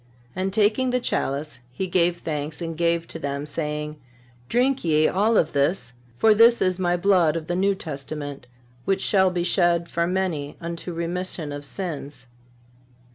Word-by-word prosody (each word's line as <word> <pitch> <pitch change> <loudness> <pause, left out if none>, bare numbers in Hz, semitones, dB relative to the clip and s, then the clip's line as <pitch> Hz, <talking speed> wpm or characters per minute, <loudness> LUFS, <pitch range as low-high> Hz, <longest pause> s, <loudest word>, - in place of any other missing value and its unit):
And 190 +1 -1
taking 215 +5 +2
the 250 0 +1
chalice, 140 - -2
He 160 +9 -3
gave 175 -1 +1
thanks 150 -1 -4
and 165 -2 -4
gave 170 0 +1
to - - -6
them, 140 0 -3
saying: 150 0 -4 0.5
Drink 260 +2 +2
ye 155 -2 +3
all 215 +4 +2
of 160 - +2
this; 140 -2 0 0.2
for 220 - +5
this 230 +2 +6
is 185 -1 +1
My 175 -1 +1
blood 175 -4 +3
of 165 -1 -3
the 175 - -2
New 195 +2 +2
Testament, 145 -5 -6 0.4
which 195 +4 0
shall 190 -2 +4
be 180 -1 -1
shed 175 -2 +2
for 170 0 0
many 175 -6 -2
unto 170 +1 -5
remission 170 -2 -3
of 145 0 -6
sins." 145 -6 -6
170 Hz, 165 wpm, -24 LUFS, 150-190 Hz, 0.5 s, this